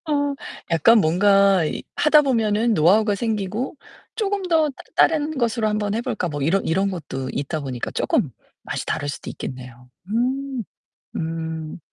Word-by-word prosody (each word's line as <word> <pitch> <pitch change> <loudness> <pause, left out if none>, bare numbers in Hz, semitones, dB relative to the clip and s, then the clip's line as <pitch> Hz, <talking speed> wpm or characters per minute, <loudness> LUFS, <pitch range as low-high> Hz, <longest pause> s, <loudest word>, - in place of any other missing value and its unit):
아. 285 -2 0 0.4
약간 175 +8 +5
뭔가 195 +1 +4
이 - - -3
하다 300 0 +5
보면은 225 -4 +2
노하우가 205 +6 +4
생기고 215 +2 -2 0.4
쪼금 405 -3 -1
더 320 -3 +3 0.3
다른 315 -1 +3
것으로 230 -2 +1
한번 210 -1 -1
해 225 - 0
볼까? 180 - -2
뭐 145 -3 -4
이런 180 +7 +1
이런 190 +4 +1
것도 135 -7 -5
있다 150 +3 -3
보니까 130 -4 -4
쪼금 - - 0 0.3
맛이 - - -4
다를 145 - -2
수도 140 - -5
있겠네요. 125 -1 -8 0.2
음. 255 +3 -1 0.5
음. 160 0 -4
205 Hz, 285 characters per minute, -22 LUFS, 160-245 Hz, 0.5 s, 약간